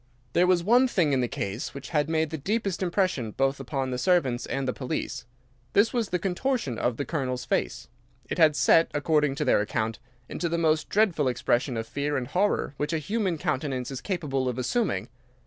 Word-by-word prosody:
"There 180 +1 +4
was 180 -2 +3
one 245 +7 +5
thing 170 - +1
in 130 - +2
the 125 - +1
case 105 +7 -4
which 140 - -7
had 150 -2 +1
made 160 -1 0
the 160 - -3
deepest 195 +3 -1
impression 185 - 0
both 135 +5 0
upon 135 -1 -3
the 125 - -2
servants 135 -7 +1
and 135 -1 -2
the 130 - 0
police. 125 -1 -4 0.5
This 205 +3 +4
was 235 -4 0
the 180 - +1
contortion 185 - -1
of 120 -2 0
the 145 - -2
Colonel's 130 -5 -2
face. 125 0 -1 0.4
It - - -4
had 155 -3 +6
set, 165 +3 +4
according 150 -1 +2
to 150 +1 -2
their 125 - +4
account, 110 +1 -2 0.3
into 170 - -3
the 170 - 0
most 160 -1 +1
dreadful 190 -9 +2
expression 125 0 0
of 115 - -3
fear 145 +5 -2
and 130 - -2
horror 185 0 0
which 150 +3 -2
a - - +2
human 190 +1 -1
countenance 130 -3 -2
is 135 - -5
capable 140 -9 -1
of 125 - -4
assuming. 130 - 0
145 Hz, 200 wpm, -27 LUFS, 130-180 Hz, 0.5 s, had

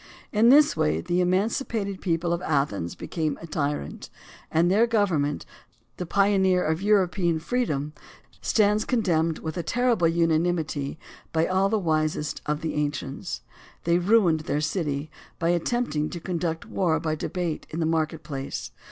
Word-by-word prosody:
In 225 +2 +5
this 290 +3 +6
way 75 +1 +1
the 175 - 0
emancipated 200 +2 0
people 170 -1 0
of 170 - -2
Athens 140 - -1
became 155 -3 -3
a - - -8
tyrant; 145 - -3 0.4
and 170 +3 +3
their 220 +5 +4
government, 180 -11 +1 0.5
the 180 - -4
pioneer 190 -1 +3
of 160 +3 0
European 185 -4 +2
freedom, 155 - -1 0.5
stands 210 0 +3
condemned 170 - +1
with 160 +2 -5
a - - 0
terrible 230 -1 +2
unanimity 165 -3 0 0.3
by 160 0 +2
all 190 +2 +2
the 220 - +2
wisest 155 -4 -1
of 150 +1 -1
the 160 - -2
ancients. 145 +2 -3 0.4
They 170 +1 +3
ruined 180 -4 +4
their 150 -1 -2
city 150 -2 -2 0.3
by 170 -1 0
attempting 170 -3 0
to 175 - -6
conduct 170 -2 -3
war 165 -5 0
by 160 -1 -1
debate 170 +1 -3
in 160 - -5
the 165 - +1
market 160 0 -1
place. 140 -3 -5
170 Hz, 150 wpm, -25 LUFS, 155-195 Hz, 0.5 s, this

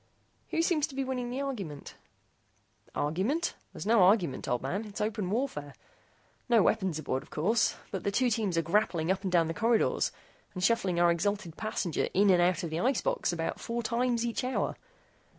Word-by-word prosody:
"Who 330 - +1
seems 315 -4 +2
to 280 - -11
be 270 - 0
winning 255 -2 -3
the 255 +3 -3
argument?" 195 - -5 1.0
"Argument? 205 - 0 0.2
There's - - -7
no 225 -1 +4
argument, 180 - +3
old 125 0 -1
man 190 +11 -2
it's 205 -1 -8
open 210 -3 -1
warfare. 190 - -2 0.7
No 230 -4 +5
weapons 190 -7 +1
aboard, 135 -4 -2
of - - -17
course, 215 +9 +1 0.2
but 190 - -4
the - - +1
two 245 +5 +2
teams 210 -6 0
are 165 - +2
grappling 170 -1 +1
up 190 - 0
and 190 -2 -2
down 170 -2 +4
the 165 - -2
corridors 225 +4 +2 0.4
and 185 - -3
shuttling 195 -5 +2
our 175 0 +5
exhalted 185 -1 -1
passenger 210 -6 -2
in 200 +1 +5
and 180 -1 +5
out 175 -1 +2
of 165 - -4
the 160 - -2
ice 260 +6 +1
box - - 0
about 165 -1 -3
four 235 +1 -3
times 240 +1 0
each 235 +1 -2
hour. 255 +1 -1
205 Hz, 190 wpm, -30 LUFS, 170-235 Hz, 1.0 s, No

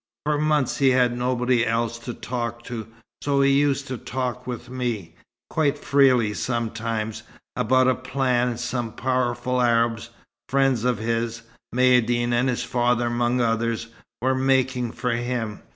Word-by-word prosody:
For 150 -1 +1
months 150 -3 +1
he 135 -2 +4
had 125 -1 +3
nobody 125 0 +1
else 115 0 -1
to 120 +1 -6
talk 120 -1 -4
to, 115 -3 -6 0.3
so 140 -1 +1
he 140 0 +4
used 140 0 +2
to 130 -3 -4
talk 125 -1 -4
with 125 0 -5
me 120 -9 -3 0.4
quite 150 -2 +1
freely 130 -6 +3
sometimes, 115 -1 -3 0.3
about 130 +3 +3
a 130 - +4
plan 125 -1 0
some 120 -2 -3
powerful 125 0 0
Arabs, 115 -1 +1 0.4
friends 135 -3 +2
of 125 -2 +2
his 115 +1 -2 0.3
Maïeddine 120 -1 +3
and 120 +2 +2
his 125 0 -1
father 120 -1 +1
among 120 +1 +1
others 115 0 0 0.3
were 130 +1 +3
making 130 -2 +1
for 125 +2 -2
him. 120 -3 -2
125 Hz, 145 wpm, -24 LUFS, 115-130 Hz, 0.4 s, he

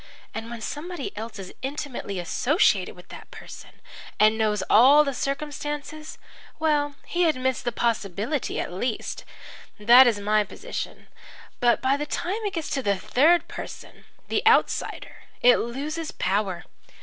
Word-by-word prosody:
And 225 +1 -6
when 235 -1 -7
somebody 300 +5 -5
else 220 +2 -7
is 190 -2 -8
intimately 265 -7 -5
associated 260 - +1
with - - -16
that - - -11
person - - -11 0.5
and 215 +1 +5
knows 210 -3 0
all 270 +7 +7
the 280 -2 -2
circumstances 295 +3 -4 0.4
well, 295 -2 +1
he 350 0 +1
admits 260 -3 -1
the 240 - -2
possibility, 230 - -2
at - - -4
least. 220 +5 -3 0.5
That 240 +5 +8
is 225 -4 +1
my 210 +1 +2
position. 440 - -7 0.5
But 240 -1 +2
by 265 +2 +3
the 295 +1 -4
time 390 +9 -2
it 405 - -2
gets 325 -3 -4
to 270 - 0
the 200 -5 +1
third 315 - +3
person - - -9 0.2
the - - 0
outsider 455 - +1 0.3
it 245 0 +7
loses 300 +7 -4
power. 190 -2 -1
260 Hz, 145 wpm, -25 LUFS, 215-300 Hz, 0.5 s, That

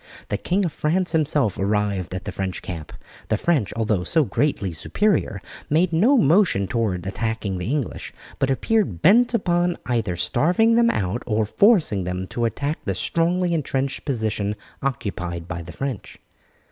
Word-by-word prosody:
The - - 0
King 190 +2 0
of 170 - -1
France 175 +3 0
himself 145 - +1
arrived 100 -2 -1
at 90 - -6
the 105 - -3
French 95 0 -4
camp. 80 -4 -6 0.4
The 110 - +1
French, 135 - +1
although 110 -5 0
so 160 - +2
greatly 120 - -1
superior, 100 - 0 0.3
made 165 +3 +2
no 230 +13 +4
motion 160 - +3
toward 95 -5 -1
attacking 105 -1 -2
the 90 - -3
English, 140 -3 -3 0.3
but 135 -1 +1
appeared 135 - 0
bent 235 +5 +5
upon 175 -4 +1
either 115 -8 -1
starving 175 - +2
them 235 0 +4
out 100 - -1
or 110 -1 +1
forcing 160 - +3
them 90 +1 -3
to 120 - -1
attack 145 +6 -2
the 95 - -2
strongly 170 - +1
entrenched 135 -3 -1
position 110 -6 -1 0.3
occupied 90 -10 -3
by 85 -1 -5
the 85 +1 -9
French. 135 -3 -5
120 Hz, 160 wpm, -23 LUFS, -, 0.4 s, bent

